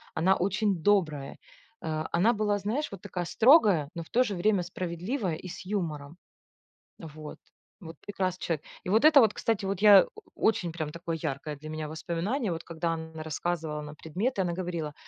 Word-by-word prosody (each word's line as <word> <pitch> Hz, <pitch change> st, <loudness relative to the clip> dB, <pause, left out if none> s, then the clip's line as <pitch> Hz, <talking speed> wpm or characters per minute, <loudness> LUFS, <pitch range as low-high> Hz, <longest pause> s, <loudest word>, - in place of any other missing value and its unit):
она 190 Hz, +4 st, +3 dB
очень 200 Hz, +2 st, +1 dB
добрая. 155 Hz, -9 st, +1 dB, 0.4 s
Э, 155 Hz, -1 st, -3 dB
она 200 Hz, +8 st, +3 dB
была, 210 Hz, -1 st, 0 dB
знаешь, 220 Hz, +10 st, -2 dB
вот 195 Hz, -3 st, -9 dB
такая 180 Hz, -1 st, -4 dB
строгая, 210 Hz, -, +5 dB
но 170 Hz, -, -4 dB
в -, -, -20 dB
то 250 Hz, -, +3 dB
же 205 Hz, -5 st, -3 dB
время 190 Hz, +1 st, +2 dB
справедливая 180 Hz, -, -3 dB
и 185 Hz, -, -9 dB
с 180 Hz, +2 st, -8 dB
юмором. 165 Hz, -6 st, -4 dB, 0.8 s
Вот. 155 Hz, -2 st, -9 dB, 0.4 s
Вот 165 Hz, -1 st, -9 dB
прекрасный 185 Hz, -3 st, -3 dB
человек! 155 Hz, -3 st, -2 dB, 0.2 s
И -, -, -5 dB
вот 220 Hz, +8 st, +4 dB
это 310 Hz, -2 st, +8 dB
вот, 220 Hz, -3 st, +3 dB
кстати, 220 Hz, -3 st, -1 dB
вот 195 Hz, 0 st, -2 dB
я 205 Hz, -2 st, +9 dB
о -, -, -10 dB, 0.3 s
очень 180 Hz, -6 st, +1 dB
прям 155 Hz, -2 st, -4 dB
такое 170 Hz, 0 st, -4 dB
яркое 145 Hz, +2 st, -3 dB
для 155 Hz, +2 st, -9 dB
меня 155 Hz, 0 st, -4 dB
воспоминание, 175 Hz, -, -2 dB
вот 165 Hz, 0 st, -4 dB
когда 165 Hz, 0 st, -2 dB
н 160 Hz, 0 st, -8 dB
рассказывала 155 Hz, -1 st, -3 dB
нам 150 Hz, 0 st, -9 dB
предметы, 195 Hz, -, -2 dB
она 175 Hz, -2 st, -1 dB
говорила: 170 Hz, -4 st, -4 dB
175 Hz, 185 wpm, -28 LUFS, 160-205 Hz, 0.8 s, я